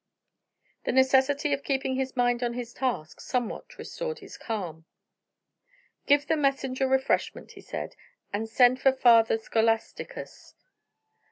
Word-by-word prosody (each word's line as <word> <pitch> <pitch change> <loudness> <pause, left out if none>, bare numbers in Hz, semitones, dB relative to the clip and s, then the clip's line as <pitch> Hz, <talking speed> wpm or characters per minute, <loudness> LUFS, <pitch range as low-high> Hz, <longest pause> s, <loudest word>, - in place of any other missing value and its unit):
The - - +1
necessity 265 +2 +3
of 280 0 -2
keeping 265 -1 -1
his 265 0 -3
mind 245 0 +2
on 240 -1 -1
his 240 -1 -6
task 205 - -3
somewhat 245 -3 -4
restored 485 -2 -5
his - - -12
calm. 175 -8 -5 1.2
"Give 285 0 +4
the 320 - +1
messenger 270 -2 0
refreshment," 265 0 0
he - - -13
said, - - -6 0.4
"and 220 +2 -2
send 250 +2 +4
for 270 - +5
Father 230 -4 +5
Scholasticus." 225 0 -2
255 Hz, 125 wpm, -27 LUFS, 230-270 Hz, 1.2 s, for